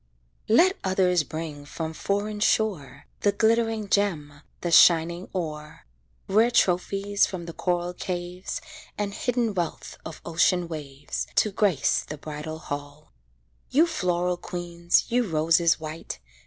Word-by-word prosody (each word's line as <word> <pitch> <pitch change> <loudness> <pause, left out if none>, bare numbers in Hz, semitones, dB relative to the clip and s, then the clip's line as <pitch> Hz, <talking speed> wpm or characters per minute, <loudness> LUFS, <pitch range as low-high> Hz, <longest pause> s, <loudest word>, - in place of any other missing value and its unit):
Let 360 - +5
others 185 -2 +2
bring 155 -2 -6
from 160 +2 -5
foreign 205 +4 -2
shore 170 - 0
The 205 - +3
glittering 225 0 +1
gem, 155 -9 0 0.2
the 175 - -2
shining 170 +2 +5
ore, 155 -4 -5 0.4
Rare 220 +4 +4
trophies 200 -1 +2
from 180 -3 -6
the 170 - -7
coral 175 0 -1
caves, 180 0 -5 0.4
And 205 -1 -2
hidden 240 -1 0
wealth 175 -3 -4
of 160 - -8
ocean 170 +1 +2
waves, 145 -4 -5
To 215 - +3
grace 195 -7 +2
the 150 - -7
bridal 155 +1 -6
hall. 145 0 -7 0.6
You 310 +5 +5
floral 180 - 0
queens! 175 -1 0
You 245 -1 +2
roses 165 0 +3
white! 155 - -6
175 Hz, 130 wpm, -26 LUFS, 160-205 Hz, 0.6 s, Let